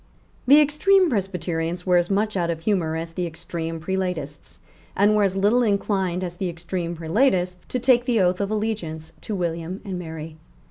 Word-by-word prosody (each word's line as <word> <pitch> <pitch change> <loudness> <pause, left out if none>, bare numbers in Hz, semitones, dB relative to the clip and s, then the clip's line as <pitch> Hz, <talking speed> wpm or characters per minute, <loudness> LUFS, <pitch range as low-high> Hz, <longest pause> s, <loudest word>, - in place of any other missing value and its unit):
The 285 +3 +8
extreme 335 +5 +4
Presbyterians 180 -4 -2
were 180 -1 +4
as 175 0 +1
much 210 +2 0
out 175 -2 0
of 165 -1 -3
humour 170 -4 0
as 165 0 -5
the 175 +1 -2
extreme 165 0 -5
Prelatists, 175 -4 -4 0.4
and 205 +2 +4
were 210 - +3
as 195 -2 +2
little 205 +6 +3
inclined 195 -4 0
as 175 -1 -5
the 185 -1 -2
extreme 170 0 -4
Prelatists 180 +1 0
to - - -2
take 245 -1 +3
the 240 -3 +2
oath 180 0 +2
of 200 - -1
allegiance 180 -8 -3
to 215 - -4
William 170 +1 -3
and 190 -3 -4
Mary. 160 -2 -7
180 Hz, 180 wpm, -23 LUFS, 165-210 Hz, 0.4 s, The